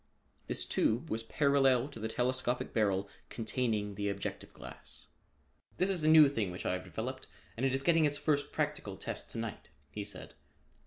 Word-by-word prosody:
This - - +1
tube 120 +9 +1
was 115 - 0
parallel 135 0 +3
to 130 - -9
the 110 - -2
telescopic 125 +1 -1
barrel 100 -3 +1 0.2
containing 110 -3 -1
the 100 +1 -2
objective 100 0 -5
lens. - - -9 0.7
"This 185 +2 +2
is 175 -5 0
a - - +3
new 155 -1 +9
thing 115 -8 -1
which 90 +1 -7
I - - +1
have 90 0 -3
developed 115 +9 -5 0.3
and 130 +4 +1
it 130 - +1
is 135 - -2
getting 165 -1 +4
its 145 -1 0
first 145 -2 0
practical - - -2
test - - -5
to - - -7
night," 115 -7 -5 0.2
he 105 - -4
said. 100 -1 -7
120 Hz, 180 wpm, -33 LUFS, 105-140 Hz, 0.7 s, new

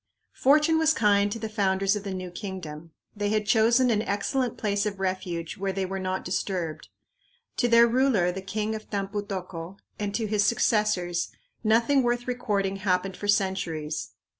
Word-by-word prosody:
Fortune 300 +4 +4
was 320 0 +3
kind 205 -2 +3
to 230 - -3
the 220 0 -4
founders 195 -2 +1
of 205 - -4
the 200 - -4
new 185 -1 -5
kingdom. 175 -5 -7 0.3
They 205 0 -1
had 215 0 +1
chosen 235 +4 +4
an 210 -2 +2
excellent 230 +5 -1
place 205 -1 0
of 200 -2 -5
refuge 185 -3 -3
where 195 0 -1
they 190 0 -2
were 195 +1 -4
not 185 0 -3
disturbed. 175 -4 -3 0.7
To 240 - +2
their 235 0 +7
ruler, 235 -7 +2
the 190 +2 -6
king 215 +3 -2
of 215 0 -7
Tampu 200 0 -2
tocco, 185 -2 -6 0.2
and 205 -1 -2
to 225 - 0
his 210 -1 +1
successors 205 -5 +1 0.3
nothing 230 +5 +4
worth 240 0 0
recording 200 -6 -1
happened 190 -1 0
for 205 - -6
centuries. 170 -6 -1
200 Hz, 170 wpm, -26 LUFS, 185-220 Hz, 0.7 s, their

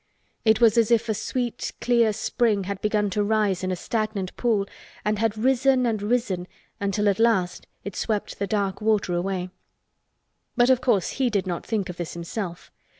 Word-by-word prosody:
It 220 -1 +4
was 230 -1 +5
as 225 - +3
if 235 0 +3
a - - +3
sweet 235 +2 -3
clear 235 -2 +3
spring 215 -1 0
had 195 +1 -5
begun 210 -1 +1
to 205 +2 +1
rise 205 -3 +1
in 185 - -1
a - - 0
stagnant 215 -1 -3
pool 220 -5 +1 0.4
and 210 -1 +1
had 220 -1 0
risen 260 +2 +3
and 220 -3 0
risen 205 -5 -1 0.3
until 200 +1 0
at 200 0 +2
last 215 -6 +1 0.2
it 200 - -6
swept 215 -3 -2
the 200 - -1
dark 200 -2 -1
water 210 -4 +1
away. 180 +1 -2 1.1
But 245 +1 +5
of 255 -1 +3
course 210 -8 +2
he 260 -3 0
did 205 -4 0
not 175 -2 -4
think 210 -4 -1
of 180 -2 -7
this 175 -1 -5
himself. 170 +1 -5
210 Hz, 185 wpm, -25 LUFS, 195-230 Hz, 1.1 s, was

